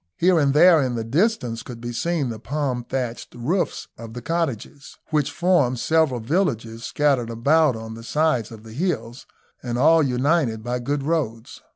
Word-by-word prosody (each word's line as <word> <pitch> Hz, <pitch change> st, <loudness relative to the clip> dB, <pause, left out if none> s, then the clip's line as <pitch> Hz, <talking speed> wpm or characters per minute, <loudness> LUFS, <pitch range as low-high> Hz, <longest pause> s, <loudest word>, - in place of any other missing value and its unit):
Here 180 Hz, -1 st, +4 dB
and 140 Hz, -2 st, +3 dB
there 165 Hz, 0 st, +7 dB
in 125 Hz, -2 st, -1 dB
the 115 Hz, -, -2 dB
distance 125 Hz, -, 0 dB
could 120 Hz, -1 st, -9 dB
be 120 Hz, 0 st, -5 dB
seen 160 Hz, 0 st, -1 dB
the 110 Hz, -2 st, -6 dB
palm 135 Hz, -1 st, -2 dB
thatched 125 Hz, -3 st, -4 dB
roofs 155 Hz, +11 st, -2 dB
of 115 Hz, 0 st, -9 dB
the 120 Hz, -, -6 dB
cottages, 145 Hz, -4 st, -3 dB
which 150 Hz, -2 st, +1 dB
form 145 Hz, -5 st, +2 dB
several 160 Hz, -2 st, +2 dB
villages 115 Hz, -, -1 dB
scattered 135 Hz, -5 st, +1 dB
about 140 Hz, +5 st, +3 dB
on 110 Hz, 0 st, -7 dB
the 115 Hz, -, -9 dB
sides 150 Hz, -3 st, 0 dB
of 110 Hz, -1 st, -11 dB
the 110 Hz, -1 st, -11 dB
hills, 120 Hz, -7 st, -3 dB, 0.3 s
and 120 Hz, -1 st, -3 dB
all 160 Hz, +5 st, +5 dB
united 130 Hz, -3 st, +1 dB
by 125 Hz, +1 st, -2 dB
good 140 Hz, +3 st, -2 dB
roads. 135 Hz, -6 st, -3 dB
130 Hz, 175 wpm, -23 LUFS, 115-160 Hz, 0.3 s, there